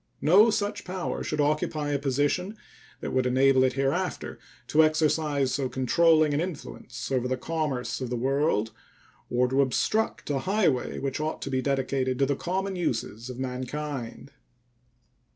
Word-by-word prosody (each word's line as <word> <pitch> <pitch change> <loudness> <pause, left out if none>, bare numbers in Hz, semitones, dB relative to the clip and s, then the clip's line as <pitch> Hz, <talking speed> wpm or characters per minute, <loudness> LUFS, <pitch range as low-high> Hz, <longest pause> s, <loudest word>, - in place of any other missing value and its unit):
No 200 +9 +6
such 205 -1 -1
power 180 -1 -4
should 155 - -3
occupy 150 0 0
a 140 - 0
position 145 - 0 0.4
that - - -4
would 130 -1 +2
enable 130 +1 +4
it 130 -1 +2
hereafter 135 +1 -2 0.3
to 160 +1 +4
exercise 155 -3 +1
so 130 -1 -1
controlling 155 +4 +3
an 145 - +1
influence 150 - -6
over 125 -1 +1
the 130 0 -1
commerce 145 -3 -2
of 130 - -3
the 125 - -2
world 135 -3 +1 0.6
or 125 +1 +2
to 135 +2 +2
obstruct 215 - 0
a 140 - 0
highway 185 -6 +1
which 135 0 -3
ought 155 +1 -2
to 140 - -5
be 130 -1 +1
dedicated 135 -1 0
to 140 - +3
the 140 +1 0
common 190 +5 -2
uses 115 - -3
of 125 - -7
mankind. 130 0 -5
140 Hz, 155 wpm, -27 LUFS, 130-155 Hz, 0.6 s, No